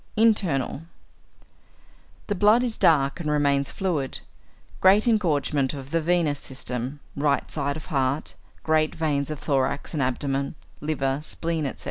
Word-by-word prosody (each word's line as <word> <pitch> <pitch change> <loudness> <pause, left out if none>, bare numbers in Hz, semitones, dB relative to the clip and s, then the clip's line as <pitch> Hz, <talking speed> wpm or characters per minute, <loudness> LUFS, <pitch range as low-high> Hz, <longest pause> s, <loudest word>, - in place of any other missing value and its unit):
Internal. 185 - +2 1.4
The 205 - -1
blood 210 +5 +4
is 235 -3 -2
dark 140 -3 +3
and 155 -3 -3
remains 140 -2 +2
fluid; 160 -9 -2 0.6
great 200 +5 +5
engorgement 150 - +1
of 135 -2 -7
venous 165 0 +1
system, 130 0 -5 0.2
right 140 0 0
side 140 -1 -2
of 155 - -9
heart, 135 +2 0 0.3
great 155 -1 +2
veins 145 -3 0
of 155 - -4
thorax 140 +1 -1
and 150 - -1
abdomen, 135 +2 -1 0.2
liver, 140 -3 -1
spleen, 160 -1 -2
etc. - - -7
150 Hz, 130 wpm, -25 LUFS, 140-165 Hz, 1.4 s, great